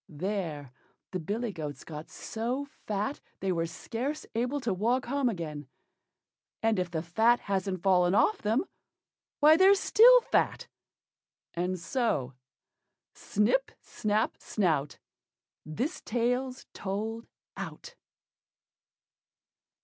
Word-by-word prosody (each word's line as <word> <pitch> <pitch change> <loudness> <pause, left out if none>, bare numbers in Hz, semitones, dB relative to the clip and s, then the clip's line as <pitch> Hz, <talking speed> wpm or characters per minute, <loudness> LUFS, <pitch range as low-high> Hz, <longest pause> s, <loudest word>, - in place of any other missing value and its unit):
There 160 -5 -4 0.4
the 185 - -2
billy 210 +6 -3
goats 150 -4 -6
got 155 -1 -8
so 245 +5 -3 0.2
fat 210 +6 -2 0.2
they 190 - -1
were 165 -2 0
scarce 245 - -4
able 245 +5 0
to 230 -5 0
walk 235 +7 +1
home 275 0 +1
again; 155 - -5 1.0
and 225 -3 +2
if 180 -1 -1
the 160 -2 -3
fat 225 +8 +3
hasn't 190 -2 -2
fallen 180 -1 +4
off 425 - +3
them, 225 - +1 0.8
why 305 +2 +8
they're 385 +2 +7
still - - +7
fat; - - 0 0.9
and 180 +2 -1
so: 170 - -1 0.8
Snip, 220 - +1
snap, 215 -1 -1
snout, 155 -8 0 0.7
This 250 - -3
tale's 250 +3 -1
told 220 +4 -4 0.3
out. - - -7
210 Hz, 110 wpm, -29 LUFS, 175-250 Hz, 1.0 s, why